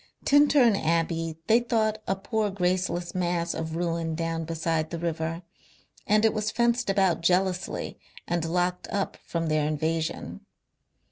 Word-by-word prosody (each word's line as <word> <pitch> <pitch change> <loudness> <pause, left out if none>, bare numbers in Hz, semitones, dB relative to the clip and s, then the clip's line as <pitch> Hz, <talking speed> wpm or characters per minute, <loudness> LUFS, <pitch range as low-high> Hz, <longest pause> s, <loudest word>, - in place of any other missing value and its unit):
Tintern 285 -5 +5
Abbey 165 -1 0
they 225 +5 +5
thought 220 -3 0
a 195 - +1
poor 215 +2 -1
graceless 180 -2 -1
mass 175 -2 -1
of 160 0 -4
ruin 165 -1 -1
down 165 0 -2
beside 160 -1 -1
the 170 - -4
river, 165 0 -3 0.6
and 215 +1 +4
it 220 - +4
was 215 -1 -1
fenced 235 0 +1
about 195 -4 +2
jealously 180 +1 0 0.3
and 175 -1 0
locked 180 +2 -1
up 200 -1 -2
from 165 -1 -2
their 155 -1 +1
invasion. 160 +1 -2
175 Hz, 140 wpm, -27 LUFS, 165-205 Hz, 0.6 s, Tintern